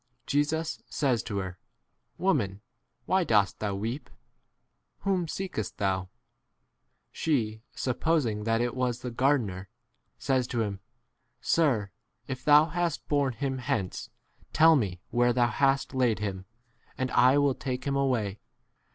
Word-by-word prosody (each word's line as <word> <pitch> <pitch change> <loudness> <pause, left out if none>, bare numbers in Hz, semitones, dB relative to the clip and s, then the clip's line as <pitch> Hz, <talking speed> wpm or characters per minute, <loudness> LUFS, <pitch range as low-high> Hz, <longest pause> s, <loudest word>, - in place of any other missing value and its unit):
Jesus 155 +3 0
says 130 -6 +1
to 100 - -5
her, 95 -2 -4 0.6
"Woman, 110 - 0 0.4
why 190 0 +2
dost 105 - +2
thou 100 -2 -2
weep? 115 +8 -4 0.9
Whom 190 -3 0
seekest 180 - -4
thou? 95 -2 -1 1.0
She 110 -8 -1
supposing 130 -5 0
that 115 0 +2
it 120 0 0
was 125 -1 -2
m - - -2
the - - -14
gardener, 110 -9 +1 0.5
says 130 -2 0
to 120 -3 -1
him, 100 -2 -4 0.6
Sir, 120 - +1 0.3
if 130 -1 -6
thou 150 +1 +7
' 160 - -10
hast 175 -2 -1
borne 140 -3 +1
him 135 +1 -3
hence, 125 -9 -2 0.4
tell 160 +1 +7
me 95 -10 -1
where 120 0 +3
thou 120 -1 +3
hast 135 0 +1
laid 125 -4 +2
him, 95 -3 -4 0.5
and 130 0 -2
I* 125 +2 +5
i° - - +4
will 140 -1 +3
take 125 -1 -4
him 140 -1 0
away. 120 -7 0
125 Hz, 145 wpm, -28 LUFS, 105-145 Hz, 1.0 s, thou